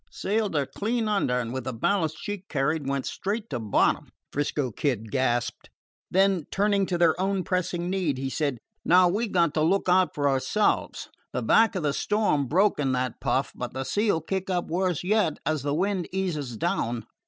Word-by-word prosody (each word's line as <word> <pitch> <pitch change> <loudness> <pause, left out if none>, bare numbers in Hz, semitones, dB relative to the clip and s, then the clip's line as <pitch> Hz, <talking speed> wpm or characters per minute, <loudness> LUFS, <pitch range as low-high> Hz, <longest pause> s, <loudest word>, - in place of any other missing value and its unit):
"Sailed 210 -3 -1
her 145 -2 +2
clean 220 - -2
under, 195 -12 +1
and, 115 -1 -4
with 130 -2 -4
the 130 - -3
ballast 160 - 0
she 205 -3 -4
carried, 145 0 0
went 140 -1 -1
straight 210 +3 -3
to 125 - -2
bottom," 110 -3 +1 0.2
'Frisco 145 -2 -1
Kid 110 -3 -2
gasped. 120 -2 -1 0.4
Then, 190 -3 +2
turning 200 -1 +1
to 175 - -1
their 170 -2 +4
own 195 -1 0
pressing 175 -2 -1
need, 180 -7 0
he 135 +1 -3
said: 140 -1 -1 0.3
"Now 180 +1 +6
we 210 +7 0
've - - -10
got 170 -4 +2
to 155 - 0
look 185 +6 +2
out 185 0 +3
for 145 -1 +1
ourselves. 140 +10 0 0.2
The - - -2
back 225 -1 +4
of 180 - -2
the 145 -2 +1
storm 205 -10 +1
broke 190 +8 +2
in 135 -3 +1
that 125 -1 -2
puff, - - 0
but - - -6
the 135 - -2
sea 210 +9 +1
'll 165 - 0
kick 190 +4 -3
up 180 -2 -1
worse 180 -1 0
yet 200 -5 +1
as 155 -2 0
the 145 +1 -1
wind 190 +1 0
eases 155 -11 -2
down. 115 +1 -1
170 Hz, 200 wpm, -26 LUFS, 135-195 Hz, 0.4 s, Now